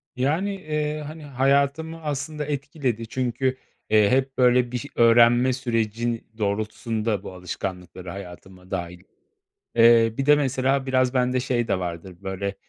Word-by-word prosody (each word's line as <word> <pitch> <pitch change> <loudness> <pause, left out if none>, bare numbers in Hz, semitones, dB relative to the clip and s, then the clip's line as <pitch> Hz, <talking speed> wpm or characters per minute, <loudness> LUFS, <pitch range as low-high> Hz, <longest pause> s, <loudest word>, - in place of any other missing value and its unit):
Yani, 160 +10 0
eee, 150 -3 -3
hani, 155 0 -9
hayatımı 140 +4 0
aslında 150 +1 -3
etkiledi 135 -5 -3
çünkü, 130 +1 -1 0.3
eee, 105 -1 +5
hep, 135 +1 +1
böyle, 125 -1 +4
bir 125 - -1
ş 140 - -6
öğrenme 120 +2 +5
süreci 115 -2 -1
doğrultusunda 110 0 -2
bu 95 - -8
alışkanlıkları 90 0 -6
hayatıma 90 0 -11
dâhil 90 -1 -5 0.7
Eee, 115 -1 +6
bir 135 - -1
de 150 0 +7
mesela 135 -1 0
biraz 130 -1 +1
bende 125 0 +1
şey 120 -2 -1
de 95 - 0
vardır, 90 +1 -6
böyle, 100 +1 -4
125 Hz, 135 wpm, -24 LUFS, 105-135 Hz, 0.7 s, de